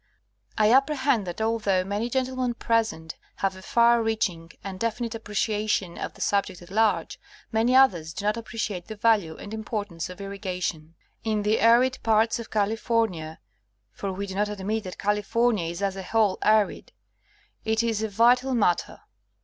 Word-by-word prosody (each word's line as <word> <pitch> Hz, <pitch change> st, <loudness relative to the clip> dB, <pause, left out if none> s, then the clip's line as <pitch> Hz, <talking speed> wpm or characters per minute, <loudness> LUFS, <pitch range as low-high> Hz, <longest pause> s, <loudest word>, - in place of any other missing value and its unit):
I 215 Hz, +1 st, +4 dB
apprehend 270 Hz, -5 st, +2 dB
that 175 Hz, +4 st, -5 dB
although 215 Hz, -4 st, +1 dB
many 205 Hz, +5 st, -2 dB
gen 260 Hz, +1 st, +1 dB
tlemen 255 Hz, -2 st, -3 dB
present 220 Hz, -9 st, -1 dB, 0.2 s
have 195 Hz, -1 st, -1 dB
a 190 Hz, -, -11 dB
far 235 Hz, +3 st, +4 dB
reaching 200 Hz, -7 st, -1 dB
and 190 Hz, -1 st, -6 dB
definite 230 Hz, 0 st, -2 dB
appreciation 210 Hz, -4 st, -1 dB
of -, -, -5 dB
the -, -, -12 dB
subject 200 Hz, -2 st, 0 dB
at 175 Hz, -, -15 dB
large, 220 Hz, +1 st, +1 dB, 0.3 s
many 230 Hz, +3 st, +2 dB
others 180 Hz, -12 st, +4 dB
do 185 Hz, +4 st, -6 dB
not 210 Hz, +1 st, +2 dB
appreciate 220 Hz, -6 st, -4 dB
the 220 Hz, -, -6 dB
value 205 Hz, -7 st, +2 dB
and 205 Hz, -, -9 dB
importance 205 Hz, -6 st, -4 dB
of 180 Hz, -, -10 dB
irrigation. 185 Hz, -5 st, -4 dB, 0.3 s
In 215 Hz, -2 st, 0 dB
the 215 Hz, +2 st, +2 dB
arid 240 Hz, +3 st, +4 dB
parts 225 Hz, +1 st, +2 dB
of 230 Hz, -, -8 dB
California 210 Hz, -6 st, -1 dB, 0.5 s
(for 195 Hz, -, -4 dB
we 195 Hz, +2 st, -4 dB
do 190 Hz, -, -7 dB
not 205 Hz, +2 st, 0 dB
admit 210 Hz, +1 st, -3 dB
that 185 Hz, -, -7 dB
California 210 Hz, -1 st, +1 dB
is 170 Hz, +4 st, -5 dB
as 195 Hz, -1 st, 0 dB
a 195 Hz, -, -5 dB
whole 205 Hz, 0 st, +1 dB
arid) 215 Hz, -1 st, +2 dB, 0.7 s
it 220 Hz, +1 st, +1 dB
is 225 Hz, -2 st, 0 dB
a 220 Hz, -, -1 dB
vital 245 Hz, +5 st, +3 dB
mat 190 Hz, -6 st, +3 dB
ter. -, -, -14 dB
215 Hz, 170 wpm, -26 LUFS, 190-230 Hz, 0.7 s, I